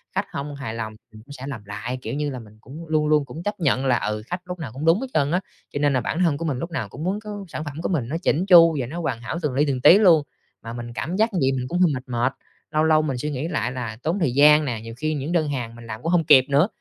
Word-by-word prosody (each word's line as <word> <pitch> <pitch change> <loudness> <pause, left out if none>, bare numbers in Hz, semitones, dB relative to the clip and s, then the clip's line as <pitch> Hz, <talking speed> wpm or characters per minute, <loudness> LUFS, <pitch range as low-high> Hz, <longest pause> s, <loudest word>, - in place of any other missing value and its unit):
Khách - - 0
hông 140 +1 -5
hài 135 -5 -5
lòng 110 -1 -5 0.2
mình 110 - -12
cũng 140 - -14
sẽ 135 0 -8
làm 115 -8 -7
lại, 105 +5 -5
kiểu 115 - -5
như 145 +1 -1
là, 130 -2 -5
mình 110 -2 -15
cũng 155 +7 -10
luôn 155 -1 +1
luôn 150 -1 +3
cũng 155 +6 -9
chấp 205 -1 -3
nhận 160 - +2
nhận - - -3
là, 125 -2 +3
ừ, 105 0 -2
khách 180 +1 -4
lúc 180 -1 -6
nào 135 -9 -6
cũng 140 +5 -5
đúng 165 +6 +4
hết 270 - -3
trơn 145 0 +2
á, 180 - +2 0.3
cho - - -2
nên 145 -1 +2
là 130 - +1
bản 155 - -3
thân 165 -6 +2
của 165 - -4
mình 145 -5 -1
lúc 170 +3 -5
nào 165 - -3
cũng 150 - -8
muốn 195 +3 -1
có 205 -2 -7
sản 155 - -6
phẩm 145 - -5
của - - -2
mình 145 -10 -1
nó 160 - -1
chỉn 170 +2 +1
chu 165 -4 +7
và 125 - -1
nó 165 +8 -5
hoàn 130 -8 -2
hảo 140 +8 -4
từng 150 -5 -1
li 140 - +2
từng 130 -3 -1
tí 180 - +8
luôn. 175 -8 +5 0.4
Mà 115 +1 -7
mình 120 0 -7
cảm 170 +8 -3
giác 220 +1 +1
như 180 - 0
vậy 135 0 +3
mình 125 0 -3
cũng 175 +6 -2
hơi 180 -3 +4
mệt 125 - -4
mệt, 125 +1 0 0.4
lâu 155 0 +2
lâu 155 -1 +4
mình 140 -4 -2
suy 150 +4 -3
nghĩ 140 +3 -3
lại 125 -7 -1
là 120 -4 -5
tốn 165 +6 0
thời 155 -9 +1
gian 150 +2 +6
nè, 115 -4 -3
nhiều 115 0 -8
khi 155 +4 -1
những 145 +2 -3
đơn 165 -3 +1
hàng 120 -4 -4
mình 120 0 -12
làm 110 0 -7
cũng 165 - 0
hông 175 -2 +3
kịp 130 -3 +7
nữa. 145 +6 +4
145 Hz, 325 wpm, -23 LUFS, 125-165 Hz, 0.4 s, tí